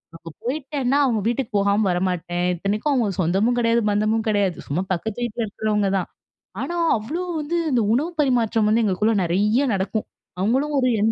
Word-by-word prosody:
அங்க 165 0 -10
போய்ட்டேன்னா 270 0 -1
அவங்க 235 -5 +1
வீட்டுக்கு 240 0 -1
போகாம 200 +1 +2
வரமாட்டேன். 175 -1 -1
இத்தனைக்கும் 205 - -1
அவங்க 240 -6 +1
சொந்தமும் 195 +8 +1
கிடையாது, 230 0 +2
பந்தமும் 215 +2 +1
கிடையாது. 200 -4 +1
சும்மா 165 +6 -1
பக்கத்து 220 +7 -3
வீட்ல 235 0 -2
இருக்கிறவங்க 210 -1 -1
தான். 185 - -3 0.5
ஆனா, 345 - -3 0.2
அவ்ளோ 290 +12 -4 0.2
வந்து 300 +3 -3 0.2
இந்த 245 -3 +3
உணவு 300 +8 0
பரிமாற்றம் 235 -6 +2
வந்து 225 +2 +3
எங்களுக்குள்ள 210 +2 +1
நிறைய 210 +10 +2
நடக்கும் 195 +3 -2 0.3
அவங்களும் 265 +9 +1
ஒரு 255 - +2
என் 220 +2 +3
220 Hz, 160 wpm, -22 LUFS, 200-245 Hz, 0.5 s, இந்த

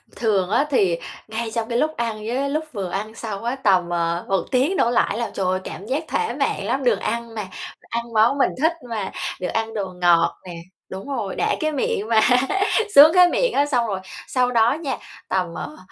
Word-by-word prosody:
Thường 200 -5 +1
á 275 +7 +2
thì 190 - +2 0.3
ngay 225 +1 -4
trong 230 -1 -2
cái 235 - 0
lúc 310 +3 0
ăn 230 -2 -2
với 270 +4 -1
lúc 310 +2 -2
vừa 195 -5 -3
ăn 215 +3 -4
xong 215 -2 -6
á, 240 +3 -1
tầm, 190 -9 +2
ờ, 170 0 -1
1 195 -1 +1
tiếng 275 +9 +2
đổ 235 - +2
lại - - +3
á - - -2
là, - - -7
trời 195 - -2
ơi, 185 +1 +1
cảm 195 - -8
giác 275 +7 -1
thỏa 445 - -1
mãn - - -1
lắm! 270 0 -1
Được 230 -6 +2
ăn 230 0 -3
mà, 210 -3 -4 0.3
ăn 235 0 -5
món 225 +5 +4
mình 275 - +3
thích 320 +2 +3 0.2
mà, 215 -4 -3 0.3
được 180 - -1
ăn 225 0 -2
đồ 205 -3 -2
ngọt 170 -1 +4
nè 175 -2 -7 0.3
đúng 190 +6 -7
rồi, 200 -4 -3
đã - - +1
cái 310 0 0
miệng 255 -7 -1
mà, 225 -1 +5 0.8
sướng 305 +4 +10
cái 360 -1 +7
miệng - - +1
á. 285 - +3
Xong 245 -5 +1
rồi 195 -3 -2 0.3
sau 250 -1 +1
đó 230 0 +4
nha, 285 -3 -3 0.3
tầm, 180 -3 -1
ờ, 305 - -6
230 Hz, 220 wpm, -22 LUFS, 195-270 Hz, 0.8 s, sướng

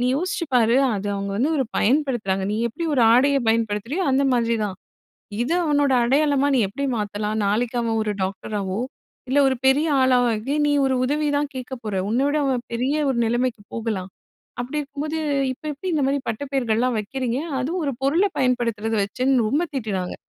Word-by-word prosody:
நீ 245 - +1
யோசிச்சு 365 +3 -2
பாரு, 235 0 +4 0.2
அது 200 +1 -4
அவுங்க 200 0 -3
வந்து 265 +9 +1
ஒரு 265 - +2
பயன்படுத்துறாங்க. 240 -7 +1
நீ - - -1
எப்படி 285 +9 -5
ஒரு 255 - +3
ஆடைய 275 +4 +4
பயன்படுத்துறியோ, 225 - 0
அந்த 275 +1 +3
மாதிரி 235 -1 +1
தான். 195 -2 -4 0.7
இது 265 - -1
அவனோட 290 -3 +2
அடையாளமா 280 +2 +2
நீ - - +3
எப்படி 280 +9 -4
மாத்தலாம்? 210 0 -2
நாளைக்கு 230 +4 0
அவன் 225 -1 0
ஒரு 210 -1 -1
டாக்டராவோ, 195 +1 -3 0.5
இல்ல 275 +2 +3
ஒரு 265 - +1
பெரிய 285 +4 +3
ஆளாவோ 250 -1 +4
ஆகி, 230 +7 -3
நீ 290 - +2
ஒரு 265 -1 +1
உதவி 300 +3 0
தான் 290 0 -2
கேட்கப்போற. 245 -5 -5
உன்ன 235 +3 +1
விட 290 +1 +1
அவன் 255 -3 0
பெரிய 250 +4 0 0.2
ஒரு 260 - 0
நிலைமைக்கு 240 -1 -1
போகலாம். 215 -5 -3 0.5
அப்படி 265 +5 -3
இருக்கும்போது, 290 +2 -4 0.4
இப்ப 255 - -21
எப்படி 330 +7 -5
இந்த 305 - +1
மாரி 275 +1 +1
பட்டப் 265 +5 -5
பேர்கள்லாம் 245 -1 +1
வைக்கிறீங்க? 245 +3 -2 0.2
அதுவும் 330 +8 -2
ஒரு 280 - -1
பொருள 305 +8 +3 0.2
பயன்படுத்துறத 230 -4 0
வச்சுன்னு 255 +5 +1
ரொம்ப 300 +8 +1
திட்டுனாங்க. 200 -8 -3
250 Hz, 175 wpm, -23 LUFS, 220-280 Hz, 0.7 s, பாரு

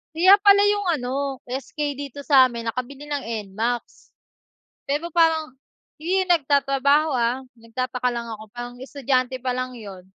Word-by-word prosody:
Kaya 375 +4 +7
pala 405 0 +6
yung 410 -1 -1
ano 250 -2 -4 0.3
SK 260 +5 -7 0.2
dito 285 0 -7
samin 255 -5 +3
nakabili 265 +4 -6
ng 290 -2 -4 0.3
NMAX. 235 +4 -1 1.1
Pero 300 +5 -1
parang 320 -5 +2 0.4
hindi 360 +5 0
yun 370 - -4
nagtatrabaho 280 -1 +3
ah 240 +2 0 0.2
nagtataka 250 +2 -3
lang 235 0 -4
ako 220 -1 -7
parang 240 0 -7
estudyante 260 -1 -1
pa 255 - -2
lang 255 0 -3
'yon 200 -6 -10
265 Hz, 140 wpm, -23 LUFS, 245-300 Hz, 1.1 s, Kaya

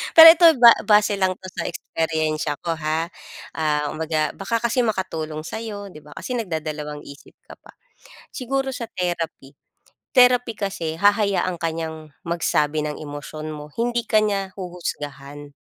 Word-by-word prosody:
Pero 325 0 +12
ito, 340 +1 +4
ba 235 -1 +10 0.2
base 210 -1 +4
lang 185 -1 +1
'to 190 - -15
sa - - -4
eksperyensiya 160 -3 -2
ko, 165 -1 -1
ha. 160 +2 -2 0.4
Ah, 150 -2 -1
kumbaga 155 -1 -1
baka 230 +4 -2
kasi 235 +2 +1
makatulong 160 -8 -3
sa'yo, 205 0 -6
di 155 - -12
ba? 150 0 -15
Kasi 250 - -5
nagdadalawang 155 -5 -5
isip 140 +1 -14
ka - - -12
pa. - - -18 0.6
Siguro 270 0 -2
sa 240 -3 -5
therapy, 170 -6 -4 0.6
therapy 250 -3 +4
kasi 170 -6 -3
hahayaan 200 -1 +2
ka 165 - +1
niyang 160 -2 -6
magsabi 155 -3 0
ng 150 - -4
emosyon 155 +1 -7
mo, 150 0 -9
hindi 240 0 0
ka 215 - +4
niya 200 -2 -1
huhusgahan. 145 -5 -7
165 Hz, 150 wpm, -22 LUFS, 155-210 Hz, 0.6 s, Pero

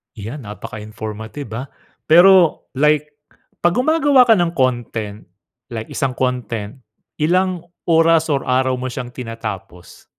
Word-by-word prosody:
Yan, 115 +4 -7
napaka-informative 110 +4 -8
ah. 135 - -5 0.4
Pero 175 +1 +6
like 150 0 +2 0.5
'pag 175 0 +2
gumagawa 285 0 +4
ka 225 - +7
ng 175 -1 0
content 115 - -2 0.5
like 110 -1 -6
isang 130 -2 -2
content, 125 -3 -3 0.4
ilang 180 +2 +1 0.2
oras 165 -1 +4
or 140 -1 0
araw 130 0 +1
mo 130 - -4
siyang 125 0 -5
tinatapos? 115 -8 -8
130 Hz, 120 wpm, -19 LUFS, 110-165 Hz, 0.5 s, ka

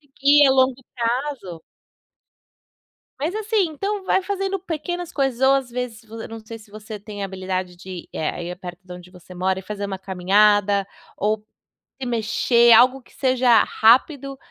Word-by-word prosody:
que 280 +1 +2 0.2
ao 265 - +3
longo 260 0 +2
prazo 240 - -3 1.6
Mas 320 +6 -2
assim, 435 -2 +1
então 395 +6 -3
vai 380 - +2
fazendo 390 0 -2
pequenas 350 0 -5
coisas 270 -4 -1
ou 270 - +6
às 270 -2 -1
vezes 245 -2 -5
vo 225 +1 -8
eu - - -6
não 225 0 -8
sei 225 +1 -10
se 215 -1 -18
você 215 +1 -9
tem 205 0 -8
habilidade 185 -2 -4
de 185 +2 -12
ir, 180 -2 -8
eh, 155 - -1
aí 175 +1 -6
perto 180 -2 -9
da 180 - -9
onde 180 0 -13
você 180 0 -14
mora, 185 +1 -1
e - - -7
fazer 205 +1 -6
uma 195 -1 -4
caminhada 200 +2 +2 0.3
ou 215 +1 -1 0.5
se 265 - -6
mexer 235 +1 +3
algo 255 +4 +5
que - - -24
seja 255 -4 +3
rápido, 270 +4 +2
225 Hz, 175 wpm, -22 LUFS, 190-270 Hz, 1.6 s, ou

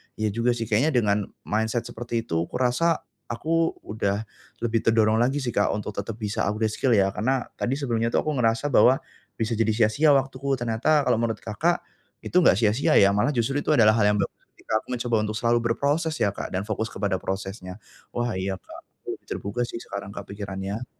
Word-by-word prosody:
iya 110 -1 -1
juga 115 +3 +1
sih 115 - -3
kayaknya 135 +8 +2
dengan 105 -4 +2 0.2
mindset 110 +2 -1
seperti 115 0 -4
itu 80 -5 -1
kurasa, 130 +7 +1 0.2
aku 165 +7 0
udah 105 0 -2 0.4
lebih 115 -1 +1
terdorong 110 -1 +4
lagi 135 +4 +1
sih, 120 - -1
Kak, 105 - +2
untuk 105 0 -4
tetap 100 +2 -5
bisa 105 -2 -2
upgrade 110 +2 0
skill 120 +2 +2
ya 100 -1 +3
karena 125 +5 0 0.2
tadi 130 - 0
sebelumnya 120 -5 -1
itu - - -2
aku 155 - -1
ngerasa 115 +4 +1
bahwa, 130 -1 +6 0.4
bisa 115 0 -1
jadi 115 -1 +1
sia-sia 115 +7 +3
waktuku 135 0 0
ternyata 120 +6 +2
kalau 125 - +3
menurut 115 -1 -1
Kakak, 160 +11 0 0.4
itu - - -7
enggak 170 - +6
sia-sia 110 +4 +2
ya, 100 0 +6
malah 105 +7 +2
justru 125 +4 +1
itu - - -4
adalah 110 -4 +6
hal 105 - +4
yang 105 - +2
bagus 100 - -1 0.2
ketika 110 - -1
aku - - -34
mencoba 120 -1 -1
untuk 105 - -3
selalu 120 +1 +2
berproses 145 +7 0
ya, 100 - +2
Kak, - - -5
dan 95 - -1
fokus 110 +1 -2
kepada 100 -2 -2
prosesnya. 95 -1 -5 0.4
Wah, 120 0 0
iya, 95 +1 -2
Kak, - - -12 0.2
aku - - -25
lebih - - -40
terbuka 100 +5 -3
sih - - -6
sekarang, 100 0 -6
Kak, - - -5
pikirannya. 100 +3 -5
115 Hz, 200 wpm, -25 LUFS, 105-125 Hz, 0.4 s, bahwa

